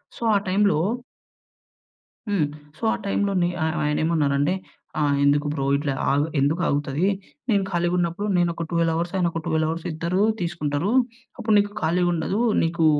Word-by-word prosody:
So, -, -, -13 dB
ఆ -, -, +6 dB
టైమ్‌లో 200 Hz, -2 st, +3 dB, 1.5 s
హ్మ్. 195 Hz, -7 st, +2 dB, 0.3 s
సో, -, -, -21 dB
ఆ -, -, 0 dB
టైమ్‌లో 200 Hz, 0 st, 0 dB
నే 175 Hz, -, +2 dB
ఆయ 160 Hz, -, +1 dB
ఆయన 150 Hz, 0 st, +1 dB
ఏమన్నారంటే, 150 Hz, -1 st, +2 dB, 0.5 s
ఆహ్, 145 Hz, -2 st, +2 dB
ఎందుకు 145 Hz, +1 st, +3 dB
బ్రో 140 Hz, -3 st, -2 dB
ఇట్లా 145 Hz, -1 st, -1 dB, 0.2 s
ఆగ్ 140 Hz, +1 st, +3 dB, 0.2 s
ఎందుకు 150 Hz, +6 st, +1 dB
ఆగుతది? 145 Hz, +4 st, 0 dB, 0.4 s
నేను 200 Hz, -3 st, +3 dB
ఖాళీగా 175 Hz, 0 st, +1 dB
ఉన్నప్పుడు 175 Hz, +4 st, -1 dB
నేను 175 Hz, -1 st, +3 dB
ఒక 165 Hz, -, -4 dB
12 165 Hz, -1 st, +2 dB
అవర్స్, 170 Hz, +2 st, -2 dB
ఆయన 180 Hz, -2 st, +2 dB
ఒక 165 Hz, -, -3 dB
12 160 Hz, 0 st, +1 dB
అవర్స్ 165 Hz, +1 st, -4 dB
ఇద్దరు 170 Hz, +4 st, -1 dB, 0.2 s
తీసుకుంటరు. 170 Hz, 0 st, -1 dB, 0.5 s
అప్పుడు 220 Hz, -3 st, 0 dB
నీకు 205 Hz, 0 st, +2 dB
ఖాళీగా 175 Hz, +2 st, +2 dB
ఉండదు. 170 Hz, +5 st, -1 dB, 0.2 s
నీకు 165 Hz, 0 st, +1 dB
165 Hz, 165 wpm, -24 LUFS, 150-180 Hz, 1.5 s, ఆ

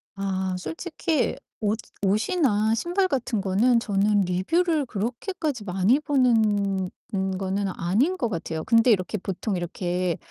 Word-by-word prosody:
아 190 Hz, -1 st, -2 dB
솔직히 325 Hz, -, -2 dB, 0.2 s
옷 210 Hz, +1 st, 0 dB, 0.2 s
옷이나 215 Hz, -, +2 dB
신발 350 Hz, -, +1 dB
같은 255 Hz, -, -1 dB
거는 215 Hz, +6 st, +3 dB
저는 205 Hz, -1 st, +2 dB
리뷰를 290 Hz, -, +1 dB
그렇게까지 250 Hz, -, -3 dB
많이 195 Hz, +7 st, +2 dB
보는 215 Hz, -9 st, +2 dB, 0.2 s
는 190 Hz, -1 st, -1 dB
거는 195 Hz, +1 st, -1 dB
아닌 235 Hz, -, +1 dB
것 245 Hz, -, 0 dB
같아요. 165 Hz, -4 st, -4 dB
근데 230 Hz, +1 st, +5 dB
이렇게 200 Hz, 0 st, +1 dB
보통 195 Hz, +2 st, -3 dB
이렇게 175 Hz, 0 st, -2 dB
210 Hz, 275 characters per minute, -25 LUFS, 190-255 Hz, 0.2 s, 근데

